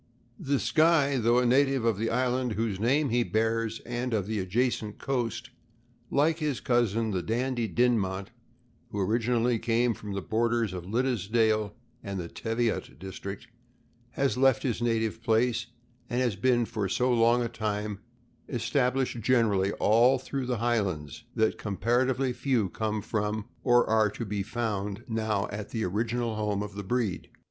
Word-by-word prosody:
The 140 -5 0
Skye, 155 -4 +3
though 120 0 +3
a 125 - +3
native 135 0 +3
of 110 -4 +1
the 115 +1 0
island 125 -1 0
whose 105 -2 -2
name 135 +6 +2
he 120 +1 +2
bears, 115 0 -1
and 120 0 -2
of 100 -4 0
the 110 0 -2
adjacent 105 +2 -1
coast, 125 -2 -2 0.6
like 155 +3 +2
his 150 -5 -1
cousin 115 -2 +1
the 95 -2 -1
Dandie 120 +3 -1
Din 120 0 +3
mont, 95 +2 -3 0.6
who 100 - -4
originally 115 +3 +1
came 115 +1 +1
from 105 -2 -7
the 100 - -3
borders 115 -2 0
of 90 -2 -6
Liddesdale 110 -2 +1 0.3
and 100 -1 -4
the 85 - -4
Teviot 115 - -2
district, 95 +4 -7 0.7
has 135 -5 0
left 135 -2 +4
his 120 -3 -1
native 115 -1 0
place, 115 0 +1 0.4
and 120 0 0
has 120 -5 +1
been 120 +3 +2
for 110 -4 -3
so 125 +5 +2
long 120 +1 +4
a - - -1
time 105 -2 -3 0.5
established 125 +1 0
generally 105 -5 +2
all 120 +5 +4
through 130 0 -4
the 125 -2 0
Highlands 100 - -1
that 110 0 +1
comparatively 125 +5 0
few 120 -5 0
come 110 0 -2
from 105 -1 -2 0.2
or 120 -1 +4
?ire 110 -1 +3
to 115 +3 -6
be 100 -1 -2
found 105 -1 -3
now 110 -3 -1
at 105 0 -5
the 110 -2 -2
original 115 +4 -1
home 105 -1 -1
of 105 -1 -7
the 100 0 -6
breed. 110 -2 -2
115 Hz, 160 wpm, -28 LUFS, 105-125 Hz, 0.7 s, left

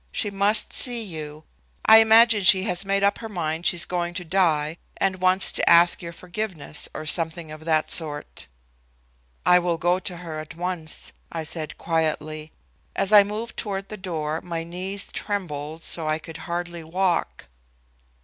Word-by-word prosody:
She 205 - -2
must 205 +2 +2
see 240 -2 -2
you. 155 -5 -8 0.4
I 220 - +9
imagine 225 0 +6
she 190 0 +6
has 180 -1 0
made 195 0 0
up 200 0 +2
her 225 - -7
mind 165 -3 -2
she's 175 -2 +2
going 175 -1 -3
to 180 -1 -4
die 160 -3 +1 0.2
and 190 -1 0
wants 185 +1 +5
to - - +1
ask 170 +2 +5
your 170 -1 -6
forgiveness 175 -3 -5
or 155 - -6
something 160 0 0
of 155 0 -10
that 155 -1 +1
sort." 150 -3 0 1.0
"I 180 - +6
will 175 -1 -1
go 175 +2 +1
to 180 -1 -4
her 165 -3 -7
at 155 +1 -9
once," 175 -2 -3 0.2
I 165 -1 -4
said 155 -1 -5
quietly. 155 -1 -2 0.4
As 195 +2 0
I 205 - +10
moved 215 +3 -6
toward 195 -2 -4
the 215 - -6
door 160 -5 -4
my 170 -2 -4
knees 185 +4 -4
trembled 160 -6 -5
so 160 -2 -1
I 155 0 +1
could 160 0 -10
hardly 175 -1 -4
walk. 175 +2 -1
175 Hz, 170 wpm, -24 LUFS, 160-195 Hz, 1.0 s, I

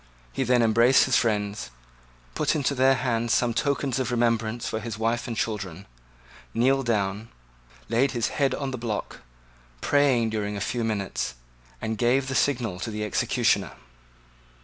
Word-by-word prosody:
He 135 - 0
then 125 -1 +3
embraced 115 +3 +5
his 130 - +1
friends, 105 - 0 0.6
put - - 0
into 145 -2 0
their 135 0 +4
hands 120 -2 0
some 120 -1 +1
tokens 140 0 0
of 130 - -1
remembrance 115 -1 0
for 110 - -2
his 110 -1 -6
wife 115 +1 -1
and 115 -2 -4
children, 100 -4 -3 0.7
kneeled 130 +2 +2
down, 105 0 -1 0.6
laid 130 +4 +2
his 120 -2 0
head 140 -3 0
on 140 -2 -3
the 130 - -5
block, 115 -3 -4 0.6
prayed 130 - +2
during 105 -1 -2
a - - -3
few 120 +4 -2
minutes, 100 - -2 0.4
and 110 - -3
gave 130 +3 +2
the - - -2
signal 120 -9 0
to 115 - -4
the 105 -1 -4
executioner. 105 - +1
115 Hz, 155 wpm, -26 LUFS, 110-130 Hz, 0.7 s, embraced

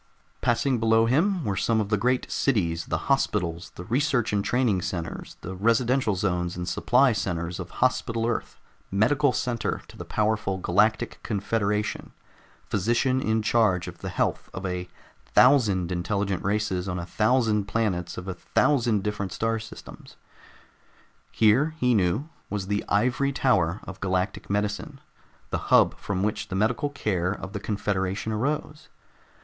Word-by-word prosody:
Passing 120 +1 +1
below 115 0 +4
him 165 - +2
were 100 -2 0
some 115 +3 +1
of 105 -2 -1
the 105 - +3
great 125 +5 0
cities, 85 -11 0
the - - -2
hospitals, 90 -11 0
the 85 - -7
research 125 - +1
and 100 -1 +1
training 115 -4 +1
centers, 85 -2 -5
the 90 +4 -6
residential 115 +3 +2
zones 90 -3 -1
and 90 0 -4
supply 125 +4 +3
centers 85 -4 -3
of 90 -1 -6 0.2
Hospital 115 -2 0
Earth, 120 - -3 0.3
medical 140 +8 +3
center 120 -3 -2
to - - -13
the - - -7
powerful 105 -3 0
Galactic 95 - +1
Confederation, 105 0 -1 0.5
physician 120 +6 +1
in 110 -2 +1
charge 105 -6 +2
of - - -9
the - - -5
health - - -1
of 95 - -5
a 90 -1 -3 0.5
thousand 105 -10 +5
intelligent 95 +1 -1
races 100 -2 -1
on 90 - -2
a 85 - -4
thousand 110 0 +2
planets 95 -4 -1
of 90 - -6
a 95 - -2
thousand 115 +1 +1
distant 100 -2 -3
star 115 +4 -1
systems. 110 0 -11 1.2
Here, 130 +9 +3
he 125 -1 +3
knew, 105 - +1 0.2
was 100 -2 -3
the 100 +1 -1
ivory 125 +6 +2
tower 105 -10 +2
of 95 - -9
galactic 95 0 -1
medicine, 105 +8 -2 0.5
the - - 0
hub - - +5
from 95 -1 -2
which 105 0 -1
the 100 - -5
medical 110 +8 +1
care 95 -10 -1
of 95 -1 -6
the 100 - -3
confederation 100 0 -2
arose. 145 +6 -3
105 Hz, 150 wpm, -26 LUFS, 95-120 Hz, 1.2 s, thousand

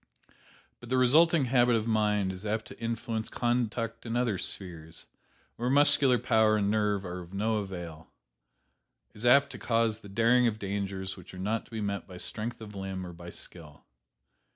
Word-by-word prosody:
But 120 - -12
the 130 - +2
resulting 150 +4 +5
habit 120 -1 +3
of 110 -1 0
mind 105 -3 +1
is 95 +2 -10
apt 110 +1 -2
to - - -12
influence 115 -1 -3
conduct 120 -2 -1
in 115 0 -4
other 120 -6 0
spheres, 80 -4 -5 0.5
where 120 +1 -1
muscular 140 -2 +5
power 110 -2 +3
and 100 -1 +1
nerve 105 -2 0
are 90 0 -5
of 90 +2 -10
no 110 +2 +1
avail 85 -6 -6 1.0
is 110 +3 -3
apt 140 +3 +5
to - - -9
cause 115 -2 +1
the 100 - -13
daring 115 +4 +4
of 110 -2 -1
dangers 95 -2 -3
which - - -12
are - - -9
not 105 +4 -2
to - - -22
be 110 -1 -4
met 100 -1 -3
by 90 - -10
strength 115 +5 -4
of 105 -1 -9
limb 95 -1 -5
or 90 - -8
by 85 +1 -10
skill. 80 -4 -9
110 Hz, 180 wpm, -29 LUFS, 95-120 Hz, 1.0 s, resulting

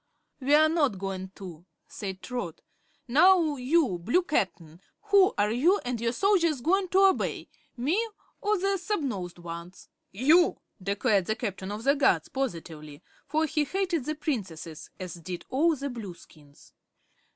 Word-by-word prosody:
"We're 295 +3 +5
not 300 - +1
goin' 190 -1 -5
to," 175 -4 -10 0.2
said 190 -3 -7
Trot. 245 -10 -5 0.5
"Now, 320 +3 +5
you 255 - +1
Blue 240 - +1
Cap'n, 175 - -2 0.3
who 395 -2 +6
are 205 +1 +2
you 335 - +3
and 245 -2 -3
your 230 0 +1
soldiers 335 - +2
going 375 +6 +2
to 385 +2 +4
obey 385 - +1 0.3
me 340 - 0 0.3
or 420 0 +1
the 390 +1 0
snubnosed 260 - -3
ones?" 170 +1 -9 0.2
"You!" 300 - +4 0.2
declared 200 0 +1
the 220 - 0
Captain 200 -4 -4
of 210 +2 -5
the 275 +2 +4
Guards, 285 -1 +2
positively, 165 - -5 0.2
for 310 +3 +1
he 300 0 0
hated 355 -3 -1
the 310 - -2
Princesses, 185 - -5
as 180 -3 -6
did 175 +1 -7
all 315 +5 +2
the 280 0 -4
Blueskins. 175 - -11
250 Hz, 145 wpm, -27 LUFS, -, 0.5 s, who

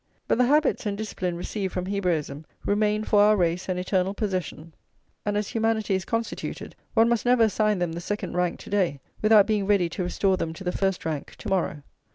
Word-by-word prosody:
But - - +1
the 250 - +5
habits 295 -5 +2
and 200 -1 -2
discipline 185 -5 -3
received 190 +2 -3
from 180 -1 -2
Hebraism 165 -7 -2 0.2
remain 210 +1 +1
for 210 -1 +4
our 210 +1 +5
race 180 +1 0
an 185 - 0
eternal 185 +1 0
possession; 185 -6 -3 0.5
and, 205 0 +1
as 210 -1 -2
humanity 225 -2 0
is 190 -2 -1
constituted, 230 +2 -4 0.2
one 225 +1 +5
must 235 -1 +1
never 245 -1 +4
assign 215 -1 +2
them 175 -2 -1
the 170 - -5
second 200 0 -4
rank 180 -1 0
to - - -11
day, 180 -8 +1 0.2
without 215 -2 +6
being 210 -3 0
ready 195 -4 +3
to 180 - -3
restore 185 +2 +1
them 160 -2 -3
to 165 - -9
the 180 - -1
first 195 -1 -1
rank 155 -3 -4
to - - -7
morrow. 170 -6 -1
195 Hz, 210 wpm, -25 LUFS, 180-215 Hz, 0.5 s, without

